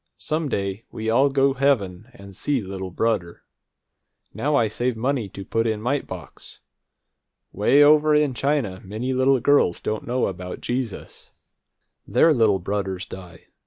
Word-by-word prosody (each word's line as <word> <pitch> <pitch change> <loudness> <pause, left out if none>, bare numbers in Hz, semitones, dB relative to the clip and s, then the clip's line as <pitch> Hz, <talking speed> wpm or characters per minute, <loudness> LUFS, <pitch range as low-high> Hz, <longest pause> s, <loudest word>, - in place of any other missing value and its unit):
Some 155 -1 -2
day 100 -1 -3
we 110 0 -3
all 135 +5 +4
go 135 0 +2
heaven 120 -7 0
and 100 -4 -12
see 140 +7 0
little 95 -2 -6
brudder! 90 -3 -2 0.9
Now 150 +1 0
I 115 -5 +3
save 120 +2 -2
money 125 -3 -1
to 95 +1 -9
put 115 +3 0
in 110 -1 -1
mite 130 +5 -1
box. 90 -4 -10 0.9
Way 135 +9 +4
over 150 +1 +5
in 150 -3 +2
China 125 -8 -1
many 110 +7 -3
little 130 +1 +3
girls 130 -8 +3
don't 110 0 -4
know 125 +1 0
about 90 -1 -5
Jesus. 120 -4 -5 0.8
Their 165 - +4
little 110 -6 +3
brudders 95 0 -3
die. 90 -3 -11
115 Hz, 150 wpm, -23 LUFS, 95-135 Hz, 0.9 s, over